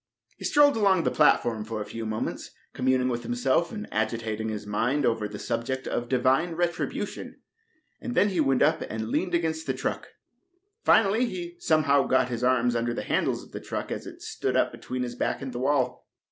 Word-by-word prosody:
He -, -, -7 dB
strolled 290 Hz, -1 st, +5 dB
along 195 Hz, -5 st, +3 dB
the -, -, +1 dB
platform 120 Hz, -7 st, +3 dB
a 105 Hz, -2 st, -3 dB
few 115 Hz, 0 st, -6 dB
moments, 110 Hz, 0 st, -3 dB, 0.2 s
communing 130 Hz, 0 st, +1 dB
with 120 Hz, -2 st, -1 dB
himself 245 Hz, -, 0 dB
and 215 Hz, -2 st, -6 dB
agitating 110 Hz, 0 st, -2 dB
his 105 Hz, -1 st, -5 dB
mind 125 Hz, +7 st, 0 dB
over 115 Hz, -2 st, +1 dB
the 105 Hz, 0 st, -8 dB
subject 130 Hz, +5 st, -3 dB
of 120 Hz, 0 st, -2 dB
Divine 135 Hz, +7 st, +2 dB
Retribution, 175 Hz, 0 st, -3 dB, 0.6 s
and 245 Hz, -1 st, -4 dB
then 205 Hz, -, +4 dB
he 185 Hz, -4 st, -2 dB
went 135 Hz, -4 st, +3 dB
up 160 Hz, +1 st, +3 dB
and 110 Hz, 0 st, -4 dB
leaned 180 Hz, +6 st, 0 dB
against 160 Hz, -1 st, -1 dB
the -, -, 0 dB
truck. -, -, -3 dB, 0.8 s
Finally, 220 Hz, +3 st, +4 dB
he 345 Hz, +5 st, -6 dB
somehow 150 Hz, -, +3 dB
got 130 Hz, -1 st, +3 dB
his 120 Hz, 0 st, -3 dB
arms 125 Hz, -1 st, +3 dB
under 120 Hz, 0 st, -1 dB
the -, -, -3 dB
handles -, -, 0 dB
of -, -, -17 dB
the -, -, -7 dB
truck -, -, -5 dB
as -, -, -4 dB
it -, -, -11 dB
stood -, -, -2 dB
up -, -, +2 dB
between 125 Hz, 0 st, -4 dB
his 120 Hz, -1 st, -4 dB
back 120 Hz, -, -1 dB
and 135 Hz, -2 st, -6 dB
the 120 Hz, -, -4 dB
wall. 130 Hz, -1 st, 0 dB
130 Hz, 195 wpm, -27 LUFS, 115-170 Hz, 0.8 s, strolled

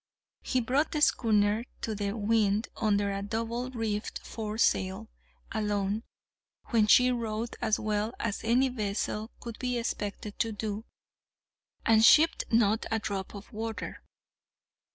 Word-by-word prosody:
He 255 Hz, -, 0 dB
brought 270 Hz, +6 st, +1 dB
the 300 Hz, -, -1 dB
schooner 215 Hz, -3 st, +3 dB, 0.2 s
to 220 Hz, -, -2 dB
the 205 Hz, +1 st, -2 dB
wind 215 Hz, 0 st, +2 dB
under 205 Hz, -2 st, +1 dB
a 195 Hz, 0 st, -3 dB
double 230 Hz, +4 st, -3 dB
reefed 225 Hz, -4 st, -3 dB
foresail 215 Hz, -1 st, -1 dB, 0.4 s
alone, 210 Hz, -1 st, -1 dB, 0.7 s
when 220 Hz, -2 st, +3 dB
she 250 Hz, +4 st, +6 dB
rode 230 Hz, -1 st, -3 dB
as 215 Hz, -, +2 dB
well 215 Hz, +1 st, -1 dB
as 225 Hz, -2 st, -2 dB
any 245 Hz, +4 st, +3 dB
vessel 215 Hz, -1 st, -2 dB
could 235 Hz, -2 st, -8 dB
be 250 Hz, -1 st, -1 dB
expected 210 Hz, -2 st, -4 dB
to 225 Hz, -, +1 dB
do, 215 Hz, +1 st, -4 dB, 1.0 s
and 220 Hz, -1 st, +5 dB
shipped 310 Hz, +8 st, +6 dB
not 225 Hz, -1 st, +2 dB
a 225 Hz, -, +1 dB
drop 200 Hz, -2 st, -4 dB
of 200 Hz, 0 st, -11 dB
water. 225 Hz, +1 st, -5 dB
220 Hz, 135 wpm, -29 LUFS, 205-230 Hz, 1.0 s, she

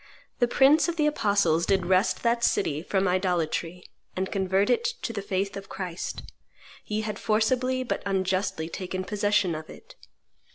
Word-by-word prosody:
The 245 Hz, -, +4 dB
prince 275 Hz, +7 st, +5 dB
of 345 Hz, -, -2 dB
the 305 Hz, -3 st, +1 dB
apostles 200 Hz, -, +2 dB
did 190 Hz, -2 st, +2 dB
wrest 185 Hz, +3 st, +2 dB
that 235 Hz, 0 st, +1 dB
city 150 Hz, -9 st, +1 dB
from 190 Hz, +2 st, 0 dB
idolatry, 180 Hz, -1 st, -1 dB, 0.3 s
and 190 Hz, +1 st, -2 dB
convert 195 Hz, +2 st, +1 dB
it 445 Hz, -, +2 dB, 0.2 s
to 230 Hz, -, -3 dB
the 205 Hz, -, -3 dB
faith 195 Hz, 0 st, -2 dB
of 195 Hz, 0 st, -8 dB
Christ. 180 Hz, -3 st, -5 dB, 0.6 s
Ye 215 Hz, 0 st, -1 dB
had 215 Hz, -1 st, -4 dB
forcibly 255 Hz, +4 st, +1 dB
but 245 Hz, -, -3 dB
unjustly 190 Hz, -3 st, -1 dB
taken 185 Hz, +2 st, -4 dB
possession 205 Hz, -3 st, +1 dB
of 155 Hz, 0 st, -7 dB
it. -, -, -13 dB
195 Hz, 160 wpm, -26 LUFS, 185-220 Hz, 0.6 s, prince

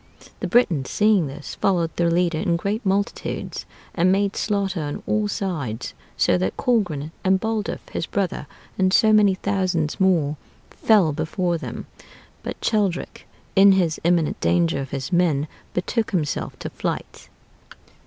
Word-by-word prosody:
The -, -, -2 dB
Britons, 175 Hz, -, +2 dB
seeing 205 Hz, -6 st, +3 dB
this, 140 Hz, +2 st, -8 dB
followed 175 Hz, -4 st, 0 dB
their 170 Hz, -1 st, +2 dB
leader 170 Hz, -1 st, +1 dB
in 175 Hz, -3 st, +1 dB
great 200 Hz, +7 st, -2 dB
multitudes, 200 Hz, 0 st, -2 dB, 0.3 s
and 180 Hz, +1 st, +3 dB
made 200 Hz, 0 st, +1 dB
slaughter 200 Hz, -4 st, -1 dB
on 145 Hz, -1 st, -5 dB
all 215 Hz, -1 st, +1 dB
sides; 155 Hz, -, -3 dB, 0.2 s
so 90 Hz, -, +3 dB
that 95 Hz, +2 st, -2 dB
Colgrin 175 Hz, -, 0 dB
and 190 Hz, 0 st, +3 dB
Baldulph, 220 Hz, -1 st, -3 dB
his -, -, -3 dB
brother, 190 Hz, -7 st, -2 dB, 0.3 s
and 185 Hz, 0 st, +4 dB
many 210 Hz, -3 st, +5 dB
thousands 185 Hz, -5 st, -1 dB
more, 165 Hz, -6 st, +2 dB, 0.3 s
fell 205 Hz, -8 st, +3 dB
before 170 Hz, +3 st, -1 dB
them. -, -, -6 dB, 0.6 s
But -, -, -6 dB
Cheldric, 200 Hz, -5 st, -1 dB, 0.3 s
in 195 Hz, 0 st, +7 dB
his 175 Hz, -4 st, +1 dB
imminent 170 Hz, -2 st, +2 dB
danger 85 Hz, +7 st, +2 dB
of 135 Hz, -, -6 dB
his 135 Hz, +3 st, -4 dB
men, 160 Hz, -5 st, +2 dB, 0.3 s
betook 220 Hz, +5 st, -1 dB
himself 155 Hz, -6 st, -2 dB
to -, -, -6 dB
flight. -, -, -5 dB
180 Hz, 145 wpm, -23 LUFS, 155-200 Hz, 0.6 s, in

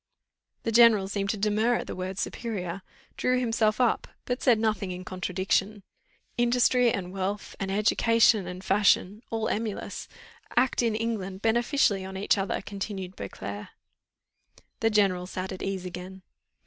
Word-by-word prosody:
The 230 Hz, -, -1 dB
general 225 Hz, -4 st, +6 dB
seemed 200 Hz, 0 st, -2 dB
to 215 Hz, -, 0 dB
demur 215 Hz, +4 st, +2 dB
at -, -, -2 dB
the -, -, -6 dB
word 185 Hz, +1 st, -4 dB
superior, 195 Hz, -5 st, -4 dB, 0.4 s
drew 250 Hz, 0 st, +2 dB
himself 225 Hz, -3 st, +1 dB
up, 245 Hz, -2 st, +2 dB, 0.2 s
but 245 Hz, 0 st, -2 dB
said 245 Hz, -3 st, +5 dB
nothing 215 Hz, -3 st, 0 dB
in 180 Hz, 0 st, -6 dB
contradiction. 190 Hz, +3 st, -1 dB, 0.6 s
"Industry, 245 Hz, 0 st, +4 dB
and 185 Hz, -3 st, -4 dB
wealth, 195 Hz, +1 st, -3 dB
and 195 Hz, -, -2 dB
education, 215 Hz, 0 st, +3 dB
and 180 Hz, +1 st, -7 dB
fashion, 200 Hz, +1 st, +3 dB
all 225 Hz, -1 st, -1 dB
emulous, 215 Hz, -1 st, -3 dB, 0.5 s
act 250 Hz, +1 st, +3 dB
in 230 Hz, -2 st, +1 dB
England 210 Hz, -4 st, -3 dB
beneficially 225 Hz, -3 st, +2 dB
on 190 Hz, 0 st, -6 dB
each 200 Hz, -, +2 dB
other," 195 Hz, -1 st, -2 dB
continued 195 Hz, -2 st, -5 dB
Beauclerc. 100 Hz, +1 st, -6 dB, 1.1 s
The 225 Hz, -, +3 dB
general 195 Hz, -4 st, +2 dB
sat 185 Hz, 0 st, -5 dB
at 190 Hz, -, -6 dB
ease 190 Hz, -2 st, -3 dB
again. 185 Hz, +1 st, -8 dB
200 Hz, 150 wpm, -27 LUFS, 190-225 Hz, 1.1 s, general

